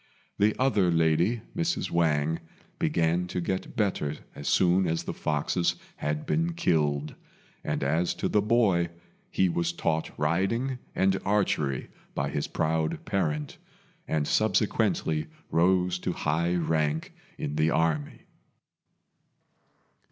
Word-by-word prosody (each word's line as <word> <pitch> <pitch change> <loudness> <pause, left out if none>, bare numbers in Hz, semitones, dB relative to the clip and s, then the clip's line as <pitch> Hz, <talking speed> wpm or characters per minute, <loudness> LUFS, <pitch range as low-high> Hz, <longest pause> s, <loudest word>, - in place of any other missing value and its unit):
The 105 +1 +3
other 110 -9 +3
lady, 85 +7 +2
Mrs. 170 0 -1
Wang, 80 -1 +2 0.4
began 85 +2 +1
to 90 - -3
get 95 +6 -3
better 95 - 0 0.2
as 70 - -7
soon 90 0 +3
as 80 0 -1
the - - -4
foxes 75 +4 0 0.2
had 75 0 -2
been 165 +1 0
killed; 75 - +1 0.5
and - - -2
as 80 +5 +1
to - - -1
the 105 - +2
boy, 100 -6 +3 0.4
he 95 - +2
was 85 -1 0
taught 80 -1 -1
riding 95 - 0 0.2
and 95 0 +2
archery 85 -10 0 0.2
by - - -1
his - - -2
proud 80 0 -1
parent, 75 -6 -1 0.5
and 75 -2 0
subsequently 75 -1 +1 0.2
rose 90 +1 +3
to - - -2
high 85 +4 0
rank 80 -2 0 0.2
in 75 - -3
the 80 +1 +3
army. 80 -2 0
85 Hz, 120 wpm, -28 LUFS, 75-95 Hz, 0.5 s, The